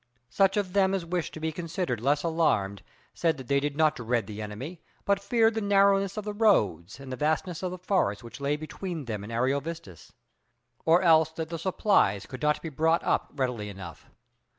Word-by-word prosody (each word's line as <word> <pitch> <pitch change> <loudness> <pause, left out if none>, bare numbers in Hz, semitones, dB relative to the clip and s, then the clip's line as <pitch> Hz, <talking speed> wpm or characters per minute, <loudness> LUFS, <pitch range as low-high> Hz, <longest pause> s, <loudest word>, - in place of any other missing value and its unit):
Such 195 - +3
of 190 -3 -1
them 195 -1 +3
as 185 -3 -3
wished 175 -1 -2
to - - -6
be 160 0 -2
considered 165 - -3
less 145 +4 +1
alarmed 155 - +1 0.3
said 165 -2 0
that 130 -3 -9
they 140 0 +3
did 145 0 -3
not 155 -1 +3
dread 120 -2 -1
the 105 +1 -7
enemy, 125 +12 -7 0.2
but 200 0 +2
feared 225 +2 +2
the 220 - -2
narrowness 195 -1 +3
of 215 - -2
the 210 0 -4
roads 110 - +2
and 135 -1 -9
the - - -2
vastness 160 +4 -1
of 185 - -2
the 185 - -6
forests 175 - 0
which 120 +4 -10
lay 140 +1 +1
between 160 0 -6
them 105 -4 -4
and 105 - -8
Ariovistus, 140 - -3 0.7
or 170 +3 +5
else 160 -2 +5
that 160 -1 -5
the 165 -1 -4
supplies 185 - +2
could 130 -1 -9
not 150 0 +1
be 165 - -4
brought 160 +3 +1
up - - 0
readily 125 -6 -2
enough. 95 -5 -10
160 Hz, 200 wpm, -28 LUFS, 125-185 Hz, 0.7 s, or